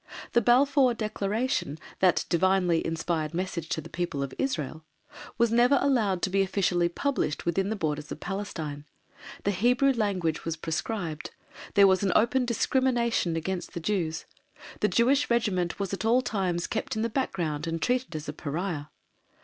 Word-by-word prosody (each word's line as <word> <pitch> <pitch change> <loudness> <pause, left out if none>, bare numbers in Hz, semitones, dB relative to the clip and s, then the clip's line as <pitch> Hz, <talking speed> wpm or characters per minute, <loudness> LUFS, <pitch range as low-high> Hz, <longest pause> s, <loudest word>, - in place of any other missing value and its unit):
The 240 - +5
Balfour 255 +2 +4
Declaration, 215 - -1 0.2
that 185 -2 +3
divinely 180 -1 +2
inspired 165 -1 -2
message 170 -3 -3
to 160 - -1
the - - -10
people 170 -5 -2
of 135 - -5
Israel, 155 - -2 0.5
was 235 -1 +3
never 245 +4 +5
allowed 220 -10 +1
to 190 - +1
be 195 +1 +3
officially 185 -3 +1
published 250 - -1
within 190 +3 0
the 220 - -1
borders 150 -5 -3
of - - -5
Palestine; 160 -7 -5 0.6
the 200 - +2
Hebrew 245 +8 +3
language 195 - -1
was 165 0 -3
proscribed; 165 0 -3 0.5
there 200 - +8
was 190 +1 +4
open 245 +3 +3
discrimination 235 -6 +1
against 175 +2 -4
the - - -2
Jews; 165 -3 -2 0.5
the - - +3
Jewish 265 +5 +3
Regiment 200 -8 0
was 200 -1 -2
at 195 - -3
all 240 +3 +3
times 185 -7 -1
kept 220 - -3
in 220 - -1
the - - +2
background 175 - -2
and 165 0 -2
treated 250 -3 -1
as 155 -1 -5
a 150 - -4
pariah. 155 +1 -3
190 Hz, 160 wpm, -27 LUFS, 165-235 Hz, 0.6 s, there